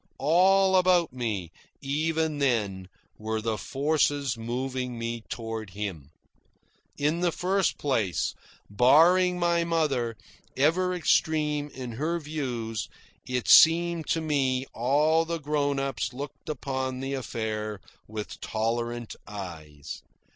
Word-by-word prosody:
All 190 +6 +4
about 180 -5 +3
me, 105 -9 -3 0.3
even 155 +2 -1
then, 105 -9 0 0.3
were 110 +1 -2
the 110 0 -1
forces 145 -2 0
moving 125 +2 -3
me 115 0 -4
toward 115 -2 -5
him. 90 -9 -5 0.9
In 150 +4 +1
the 175 -1 +2
first 190 +3 0
place, 110 - 0 0.3
barring 165 - +5
my 170 -1 +2
mother, 140 -9 0 0.4
ever 180 +6 +2
extreme 150 -3 +1
in 125 -2 -7
her 155 +9 -1
views, 125 -8 -4 0.4
it 125 -1 -2
seemed 165 0 +6
to 165 - +1
me 135 -4 0
all 150 +7 +3
the 165 +1 -3
grown 145 -2 0
ups 125 -4 -2
looked 140 +4 -8
upon 130 -2 -3
the 135 +1 -3
affair 110 -5 -3 0.3
with 105 -1 -7
tolerant 120 +1 -2
eyes. 80 -8 -8
135 Hz, 115 wpm, -27 LUFS, 115-160 Hz, 0.9 s, seemed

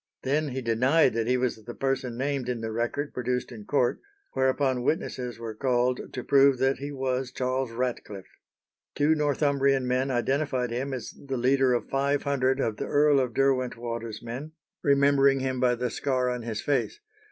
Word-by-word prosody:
Then 150 +3 +1
he 130 0 -4
denied 125 +5 +3
that 115 0 -1
he 125 +1 +3
was 125 -3 -2
the 120 +2 -8
person 135 -3 -2
named 135 -1 -2
in 120 -2 -2
the 110 0 -3
record 120 +6 -2
produced 125 0 -2
in 110 -4 -9
court, 125 -2 +1 0.3
whereupon 130 -1 +1
witnesses 125 -4 -2
were 115 -1 -6
called 125 +1 0
to 125 - -5
prove 140 -1 +5
that 135 +2 +1
he 140 +1 -5
was 130 -2 -2
Charles 130 -1 -2
Ratcliffe. 115 -5 -4 0.7
Two 150 +2 +3
Northumbrian 140 -3 +1
men 130 +2 +1
identified 130 0 0
him 130 +4 -2
as 130 -3 -5
the 135 -2 -6
leader 130 +1 +3
of 120 - -3
five 140 +1 0
hundred 135 -2 +1
of 110 -5 -1
the - - -4
Earl 145 -1 +4
of 125 -3 -1
Derwentwater's 120 -4 -1
men, 130 +7 -6 0.3
remembering 140 -1 +4
him 130 -1 -2
by 125 -1 +3
the 125 0 -2
scar 130 -2 0
on 125 -1 -3
his 115 -2 -4
face. 145 - 0
130 Hz, 175 wpm, -27 LUFS, 120-140 Hz, 0.7 s, prove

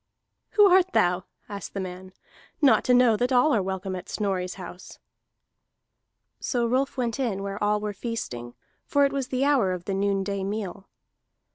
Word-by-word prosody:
"Who 415 - +7
art 375 -1 +4
thou," 180 +1 +2 0.2
asked 200 -2 -7
the - - -2
man, 185 0 -7 0.5
"not 285 -4 +5
to 250 - +4
know 245 -3 +5
that 245 +3 0
all 255 +4 +4
are 215 - +3
welcome 190 0 -3
at 180 +1 -8
Snorri's 190 -3 -2
house?" 185 -1 -10 1.4
So 240 -2 0
Rolf 260 +4 0
went 240 0 -1
in 210 -7 -1
where 200 +1 -4
all 210 0 +2
were 210 0 -4
feasting, 125 - -5 0.3
for 285 -1 +3
it 275 - -1
was 275 -2 -2
the 260 +1 0
hour 255 -11 +3
of 180 -1 -6
the 195 - -2
noonday 195 0 -1
meal. 195 -1 -4
205 Hz, 170 wpm, -26 LUFS, 190-250 Hz, 1.4 s, Who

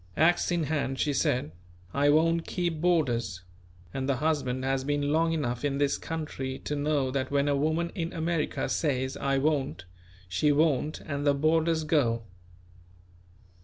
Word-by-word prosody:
Axe 175 +2 +3
in 170 -2 +1
hand 140 -3 -1
she 150 - +1
said: 125 - 0 0.4
"I 145 +1 +3
won't 165 +2 +3
keep 170 -4 -2
boarders," 120 - +1 0.5
and 135 +1 -2
the 140 - +3
husband 130 -3 -1
has 135 0 0
been 145 +1 0
long 165 +1 +2
enough 125 -7 -2
in 140 -1 0
this 140 0 +1
country 145 -5 -4
to 150 - -1
know 145 -2 0
that 130 0 -1
when 140 0 +1
a 145 - +2
woman 160 +4 0
in 170 0 -3
America 165 -2 -1
says: 130 -4 -1
"I 135 0 0
won't," 135 - 0 0.4
she 120 - +2
won't; 150 0 +1
and 140 -1 -4
the 145 -1 +3
boarders 160 +2 +2
go. 125 -7 +1
145 Hz, 160 wpm, -28 LUFS, 135-160 Hz, 0.5 s, Axe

